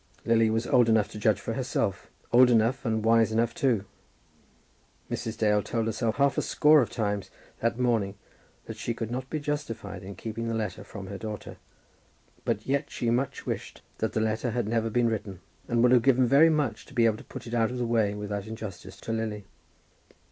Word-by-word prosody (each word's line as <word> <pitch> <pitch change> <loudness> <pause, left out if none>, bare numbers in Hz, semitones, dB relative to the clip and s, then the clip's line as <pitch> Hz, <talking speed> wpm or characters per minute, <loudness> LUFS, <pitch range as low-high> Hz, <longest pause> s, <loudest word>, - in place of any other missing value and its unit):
Lily 115 -1 +4
was 110 +2 0
old 120 -2 +4
enough 110 -2 +3
to 105 - -8
judge - - +2
for - - -4
herself, - - -2 0.2
old 125 +1 +7
enough, 120 +3 +2
and 110 -1 0
wise 115 -1 +4
enough 115 +1 +1
too. 130 - +1 1.3
Mrs. 110 0 -3
Dale 105 -1 +3
told 115 +1 -2
herself 115 0 -1
half 140 -1 +2
a - - +2
score 150 0 +5
of 115 - -1
times 105 -4 -2 0.3
that 115 0 0
morning 115 -6 +1 0.5
that - - -7
she 115 - -3
could 115 -1 -4
not 130 +2 -4
be 155 - -2
justified 145 -10 -4
in 95 +1 -8
keeping 115 +4 -5
the 115 - -1
letter 105 -5 -3
from 100 - -9
her 100 +1 -7
daughter. 110 -2 -6 0.9
But - - -1
yet 140 +2 0
she 120 -1 -1
much 130 +3 -1
wished - - -5 0.2
that 110 - -1
the 110 - +1
letter 110 +2 0
had 120 -1 -1
never 115 0 0
been 120 +1 +2
written, 105 -5 -3 0.3
and 120 0 +2
would 125 - +5
have 125 -2 +6
given 130 0 +4
very 140 +6 +6
much 145 -8 -1
to 140 - -15
be 120 -2 +4
able 110 -2 +2
to - - -11
put - - -9
it 120 - -7
out 115 -2 +2
of 125 - -5
the 125 - -1
way 110 -3 +1
without 105 0 -4
injustice 100 -3 -8
to - - -5
Lily. 110 -2 -3
115 Hz, 205 wpm, -27 LUFS, 110-125 Hz, 1.3 s, old